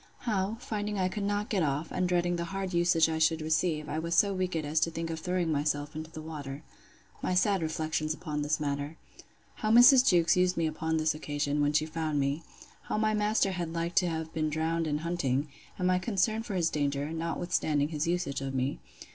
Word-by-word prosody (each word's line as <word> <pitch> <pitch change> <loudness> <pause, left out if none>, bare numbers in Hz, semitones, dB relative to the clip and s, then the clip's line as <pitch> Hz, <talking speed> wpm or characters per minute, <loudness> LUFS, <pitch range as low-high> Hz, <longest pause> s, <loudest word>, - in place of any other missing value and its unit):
How, 210 -1 -1
finding 210 -3 -3
I 185 -1 +1
could 205 - -4
not 205 +1 -1
get 200 -4 +1
off, 150 +1 -1
and 180 -1 0
dreading 175 0 +1
the 170 0 -2
hard 190 0 -4
usage 170 -1 +4
I 160 0 -2
should 160 0 +3
receive, 155 0 0
I 155 +1 -2
was 170 +1 -1
so 200 +1 +4
wicked 180 -4 -2
as 155 +2 +1
to 165 - +2
think 165 0 -4
of 160 - -4
throwing 180 0 -1
myself 145 0 -1
into 155 +1 -6
the 155 -1 -9
water. 145 -2 -7 0.6
My 185 - 0
sad 195 0 +3
reflections 155 -1 -1
upon 150 -2 -3
this 150 +1 0
matter. 145 +1 -3 0.6
How 215 - -1
Mrs. 245 +3 +8
Jewkes 170 -3 +4
used 180 0 +2
me 165 - +1
upon 160 +1 -1
this 155 0 +2
occasion, 145 -1 -2
when 145 0 +2
she 155 +1 +2
found 155 -2 -2
me. 140 +3 0 0.4
How - - -2
my 215 0 +2
master 210 -1 +2
had 170 -3 -3
like 170 +1 -2
to 180 - +5
have 160 0 -4
been 155 -1 0
drowned 160 +2 -1
in 150 -1 0
hunting; 150 -4 -1 0.3
and 180 - 0
my 185 0 +3
concern 220 +2 0
for 225 -3 -5
his 170 -2 +1
danger, 145 0 -1
notwithstanding 160 -3 -1
his 155 0 -2
usage 170 -6 -1
of 135 0 -4
me. 130 +1 -1
165 Hz, 215 wpm, -29 LUFS, 155-180 Hz, 0.6 s, Mrs